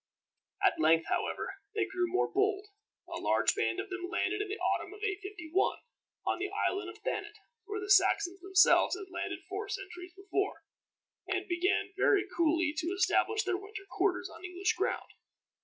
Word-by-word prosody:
At - - +4
length, 160 +1 +4
however, - - -2 0.2
they 420 -2 +2
grew 370 -3 -1
more 370 - +2
bold. 405 +1 +1 0.4
A - - -6
large - - +3
band 365 - 0
of 390 - -5
them 365 -1 -4
landed, 390 +4 0
in 415 - -2
the 410 - -3
autumn 405 -2 -1
of 420 - -14
851, 390 -4 -1 0.5
on - - 0
the 395 +2 -2
island 395 -2 -1
of - - -10
Thanet 420 0 -3 0.3
where 420 0 -4
the 410 - -5
Saxons 385 -1 +4
themselves 380 0 +5
had 380 -1 -9
landed - - -4
four 400 +2 -4
centuries 365 -2 -6
before, 395 -3 -2 0.6
and 375 0 -1
began 360 +2 +1
very 395 -1 +4
coolly 330 -1 +2
to 325 - -2
establish 415 +3 +2
their 375 -1 0
winter 405 +1 -8
quarters 380 -1 +1
on - - -13
English 365 +1 0
ground. 365 +2 -2
385 Hz, 170 wpm, -32 LUFS, 360-405 Hz, 0.6 s, themselves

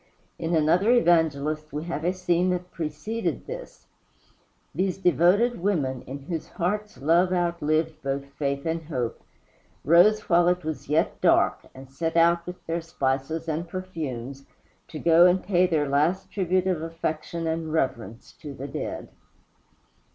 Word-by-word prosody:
In 165 0 -1
another 165 +7 +3
Evangelist 155 - +2
we 150 +1 -4
have 165 -2 -4
a 175 - +2
scene 180 -1 +1
that 180 0 -3
preceded 170 +8 -3
this. - - -9 0.9
These 185 0 -1
devoted 195 +6 +3
women, 145 -10 0
in 135 +1 -7
whose 165 +1 -5
hearts 210 +4 -3
love 170 +4 +3
outlived 160 -3 0
both 140 0 -3
faith 140 -1 -2
and 165 0 -1
hope, 125 -7 -3 0.6
rose 175 +8 +5
while 175 -2 +3
it 180 -2 +1
was 155 -3 -5
yet 155 +2 +1
dark, - - +3
and 135 0 -11
set 165 +4 -2
out 170 +1 +3
with 180 0 -8
their 165 +1 -2
spices 155 +1 -2
and 160 +2 -2
perfumes 140 -8 -6 0.4
to 155 - -8
go 170 +2 +6
and 180 +1 +2
pay 180 -2 +3
their 155 -4 +1
last 150 +7 +1
tribute 185 -2 0
of 180 -4 0
affection 165 0 -4
and 160 -1 -2
reverence 120 -7 -3
to 145 -2 -8
the 135 +2 -6
dead. 135 - -5
165 Hz, 150 wpm, -25 LUFS, 150-180 Hz, 0.9 s, go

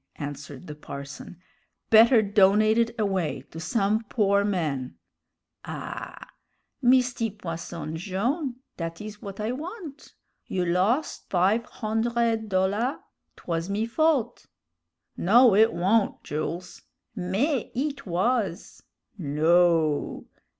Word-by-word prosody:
answered 145 +1 -7
the 150 - -7
parson; 140 +2 -9 0.5
"better 225 +1 +7
donate 210 +2 +4
it 235 0 +1
away 185 -10 -1
to 165 - -8
some 200 +6 0
poor 200 -3 +2
man 155 -10 -2 0.4
" - - -58
"Ah! - - -7 0.5
Misty 245 -2 +3
Posson 165 -5 -6
Jone', 240 - -2 0.2
dat 165 -1 -5
is 210 0 -8
w'at 200 -1 -9
I 215 +2 -1
want. 315 - -8 0.3
You 180 -1 -1
los' 190 - +1
five 195 +6 +2
hondred 225 0 -1
dollar' 200 +8 +1 0.4
'twas 165 +1 -3
me 210 +3 0
fault." 295 +1 0 0.7
"No, 235 +4 +6
it 220 +3 +5
wa'n't, 195 +5 +1
Jools." 175 +4 -5 0.3
"Mais, 210 - -1
it 280 -2 -3
was!" 190 +1 -1 0.4
"No!" 160 0 +2
200 Hz, 110 wpm, -26 LUFS, 175-230 Hz, 0.7 s, better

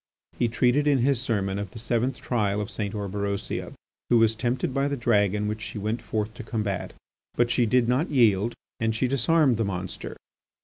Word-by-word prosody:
He 120 - +3
treated 125 +5 +2
in 145 -2 +4
his 135 -4 +2
sermon 100 -6 -1
of 100 -1 -4
the - - -12
seventh 120 +3 -1
trial 105 -4 0
of 105 +2 -4
St. 105 -2 -3
Orberosia, 100 0 -3 0.4
who 120 - +5
was 115 -1 +4
tempted 120 +3 -1
by 135 +1 +1
the 140 0 -2
dragon 105 -3 +2
which 110 +1 -3
she 110 - -6
went 110 +3 -2
forth 110 -1 -3
to - - -8
combat. 105 -3 -3 0.4
But 120 0 +2
she 120 -2 +3
did 120 +1 +3
not 130 +8 +1
yield, 115 -5 +3 0.2
and 115 -1 0
she 125 +3 +1
disarmed 140 0 +3
the 115 - +1
monster. 95 -2 -5
115 Hz, 190 wpm, -26 LUFS, 105-125 Hz, 0.4 s, who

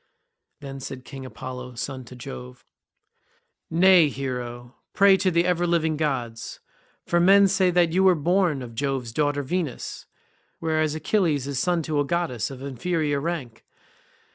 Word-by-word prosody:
Then 135 -1 -7
said 130 -1 -8
King 135 -2 -8
Apollo, 125 -1 -8
son 130 +3 -5
to 125 - -12
Jove, 65 - -9 1.0
"Nay, 175 -2 +6
hero, 125 -2 -5 0.2
pray 195 0 +6
to 190 -1 +1
the 170 -1 +2
ever 175 -1 +1
living 160 -2 +1
gods, 125 -7 -3 0.5
for 175 - +2
men 195 +3 +6
say 190 -1 +2
that 175 -2 +2
you 190 +2 +3
were 185 -2 +6
born 170 -3 +1
of 120 -2 -9
Jove's 130 -2 -2
daughter 145 +1 0
Venus, 160 -2 -4 0.5
whereas 155 -1 0
Achilles 155 -4 +1
is 140 -2 -2
son 175 +1 +1
to 150 -1 -1
a - - +3
goddess 145 -7 -1
of 135 -1 -9
inferior 145 +2 -1
rank. 140 -7 -4
145 Hz, 150 wpm, -24 LUFS, 130-175 Hz, 1.0 s, Nay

